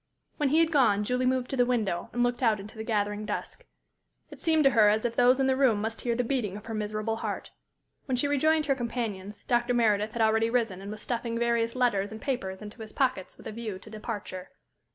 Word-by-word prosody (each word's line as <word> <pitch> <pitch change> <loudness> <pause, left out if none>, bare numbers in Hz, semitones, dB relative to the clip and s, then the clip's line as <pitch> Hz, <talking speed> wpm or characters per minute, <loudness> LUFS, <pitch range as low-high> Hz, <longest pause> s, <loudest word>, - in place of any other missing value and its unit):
When 290 -2 +1
he 305 - +3
had 330 0 +2
gone, 245 -9 +4
Julie 250 +3 0
moved 255 -1 0
to - - -1
the 250 - +4
window 220 -8 -1
and 245 - 0
looked 245 +1 0
out 225 -4 +3
into 210 +4 -10
the 220 - -5
gathering 210 -2 -1
dusk. - - -5 0.7
It - - -12
seemed 320 -2 +3
to 275 - +5
her 220 -4 +6
as 215 +2 +1
if 235 -1 -1
those 250 +2 +5
in 270 - +3
the 265 0 +3
room 260 -6 +3
must 220 +2 -3
hear 235 -1 0
the 250 - +1
beating 230 -6 -1
of 210 - -11
her 225 - -5
miserable 215 +1 -2
heart. - - -4 0.6
When 260 - +1
she 285 - +1
rejoined 310 +2 +2
her 280 - +3
companions, 225 -6 -4
Dr. 240 0 +1
Meredith 215 -2 +2
had 235 - -2
already 220 +1 +3
risen 225 -6 0
and 200 - -7
was 215 0 -7
stuffing 235 -1 -2
various 235 0 +1
letters 215 -6 +1
and 220 - -7
papers 210 -8 -3
into 210 +2 -10
his 215 -1 -8
pockets 255 -9 -1
with - - -15
a - - -5
view 215 -3 -5
to 215 +3 -14
departure. 210 -4 -6
230 Hz, 235 wpm, -28 LUFS, 210-250 Hz, 0.7 s, her